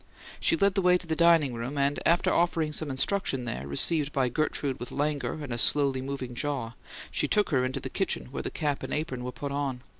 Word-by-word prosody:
She 165 - +2
led 200 +3 +3
the 195 - +1
way 180 0 +4
to 180 - -8
the 160 -1 -1
dining 165 -5 +4
room, 120 +5 -5
and, 140 +1 +1
after 170 +2 +3
offering 165 -3 +1
some 155 0 -2
instruction 135 -2 0
there, 70 - -5
received 145 - +3
by 130 -3 +1
Gertrude 140 0 -1
with 120 - -6
languor 145 0 -1
and 130 -4 -5
a 120 - -2
slowly 140 0 +4
moving 135 -2 -5
jaw, 130 -3 -3 0.4
she - - 0
took 210 -3 +2
her 130 -3 +2
into 130 +1 -2
the - - -6
kitchen, 65 - -2
where - - -4
the - - -4
cap 145 -2 -2
and - - -3
apron 135 -5 -3
were 125 - -4
put 140 +2 -6
on. 140 -3 -3
140 Hz, 230 wpm, -28 LUFS, 130-160 Hz, 0.4 s, way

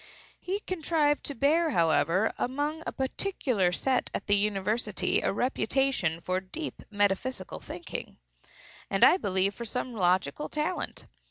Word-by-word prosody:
He 390 +3 -3
contrived 315 -5 +1
to 285 - -4
bear, 315 +6 +3
however, 170 - +2
among 290 +5 -1
a - - -1
particular 260 - 0
set 255 +8 0
at - - -3
the 205 - +3
university, 210 +1 +1
a - - +1
reputation 250 - +1
for 185 +2 -1
deep 240 - -6
metaphysical 205 +1 -1
thinking, - - -7 0.7
and, 195 - +2
I 360 - +8
believe, 190 - +1
for 235 - -7
some 250 +2 -3
logical 185 +8 +1
talent. 305 +4 -2
240 Hz, 135 wpm, -29 LUFS, 195-295 Hz, 0.7 s, I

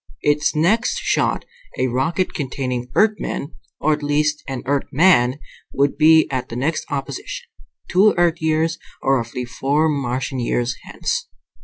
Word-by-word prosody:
Its 150 +1 +2
next 215 - +2
shot, - - 0 0.3
a - - +1
rocket 135 +9 0
containing 125 -3 -3
Earthmen, 210 -8 0 0.3
or 155 - +2
at 150 - -3
least 150 +1 0
an 135 -2 -4
Earthman, 140 -1 +3 0.4
would 140 +1 +1
be 160 +1 +6
at 130 -2 -3
the 115 - -6
next 145 +6 -1
opposition, 400 - -5 0.4
two 200 +4 +4
Earth 175 -1 +2
years, 160 +1 +1 0.2
or 135 0 +3
roughly 120 +1 -4
four 140 +6 +1
Martian 130 -2 -2
years, 120 0 0
hence. 485 0 -3
150 Hz, 140 wpm, -21 LUFS, 130-165 Hz, 0.4 s, be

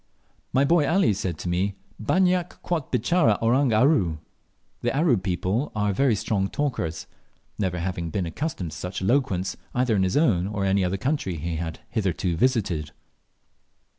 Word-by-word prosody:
My 135 +2 +3
boy 155 -2 +3
Ali 180 - +3
said 95 -4 -3
to 90 - -6
me, 95 +3 0 0.3
"Banyak 180 - +1
quot 165 -6 -2
bitchara 120 - +3
Orang 125 +3 +3
Aru" 110 - +3 0.6
(The - - 0
Aru 155 -5 +4
people 95 +7 -1
are 105 -1 +1
very 125 +2 +3
strong 100 -1 -1
talkers), 90 - -2 0.5
never 95 -3 0
having 85 -1 -3
been 95 +2 -2
accustomed 90 - -4
to 75 - -8
such 90 +2 -5
eloquence 95 -5 +1 0.2
either 125 -2 +2
in 95 - +2
his 95 +5 +1
own 100 - +3
or 100 -1 -2
any 95 0 +2
other 90 +2 0
country 130 - -1
he 80 +1 -3
had 80 0 -5
hitherto 95 -5 0
visited. 90 - 0
100 Hz, 160 wpm, -25 LUFS, 90-135 Hz, 0.6 s, Aru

